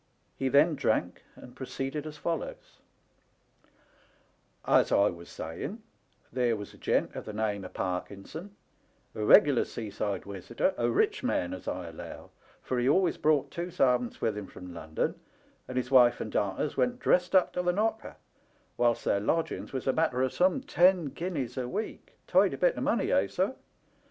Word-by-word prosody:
He 135 - -1
then 150 +5 +5
drank, 145 - -1
and 125 - -13
proceeded 135 +3 -4
as 150 -1 -8
follows: 165 +2 -5 1.9
''As - - +4
I 100 +1 +4
was 85 0 -11
saying, 195 - -6 0.5
there 125 -3 +2
was 105 -1 -8
a - - -17
gent - - 0
of - - -7
the 105 - -6
name 105 -2 -1
of 90 - -10
Parkinson, 100 - -5 0.6
a 105 - -4
regular 135 +4 +6
sea 110 -3 -6
side 100 0 -2
wisitor, 100 -3 -2
a 120 0 0
rich 115 - +1
man, 90 0 -1
as 95 - -8
I 90 -2 -3
allow, 80 - -10 0.3
for 125 - -1
he 125 +2 +2
always 180 +3 +3
brought 150 -2 +2
two 170 +1 -4
servants 125 -6 +1
with 110 -2 0
him 105 -2 -6
from 90 -1 -10
London, 80 -2 -3 0.5
and 130 - -5
his 125 0 -2
wife 125 -2 +6
and 110 - -4
darters 100 +9 -1
went 245 0 +1
dressed 180 -6 +2
up 185 - +4
to 180 - 0
the 180 0 +2
knocker, 220 +4 -1 0.6
whilst 120 -1 +2
their 100 - +2
lodgings 160 +11 -1
was 130 -2 -4
a 135 - +2
matter 145 -6 +1
of 130 - -1
some 185 +8 +2
ten 180 - +3
guineas 140 -7 -4
a 125 -1 -2
week 205 - -5
— - - -41
tidy - - +3
bit - - +2
o' - - -4
money, - - +1
eh, - - +3
sir - - -1
130 Hz, 175 wpm, -29 LUFS, 105-170 Hz, 1.9 s, regular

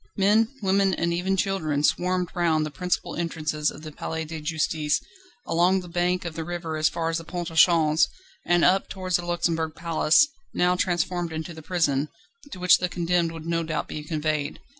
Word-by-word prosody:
Men, 210 +3 +4 0.2
women, 195 -1 +2
and 170 0 0
even 190 +3 0
children 160 -7 0
swarmed 180 +1 +1
round 160 -3 +1
the 155 - -5
principal 180 +3 -2
entrances 155 -3 -1
of 150 - -10
the 155 - -7
Palais 160 +2 -4
de 160 0 -7
Justice, 155 -1 0 0.5
along 180 +3 +2
the 180 - -10
bank 175 +1 0
of 170 - -4
the 165 0 -4
river 170 -1 -4
as 155 0 +2
far 165 -1 -2
as 165 0 -1
the - - -9
Pont 175 0 -5
au - - -10
Change, 160 -1 +5 0.4
and 175 0 +3
up 190 +2 +3
towards 185 -1 -1
the 175 - -6
Luxembourg 165 -2 -1
Palace, 165 - +3 0.3
now 180 0 +3
transformed 175 -1 -1
into 160 +2 -5
the 160 - -10
prison, 150 -4 0 0.4
to 185 - -8
which 180 0 +5
the 180 - -1
condemned 175 -1 0
would 165 -1 -9
no 165 0 0
doubt 160 -1 -3
be 150 - -6
conveyed. 150 -1 -2
170 Hz, 195 wpm, -25 LUFS, 155-180 Hz, 0.5 s, Change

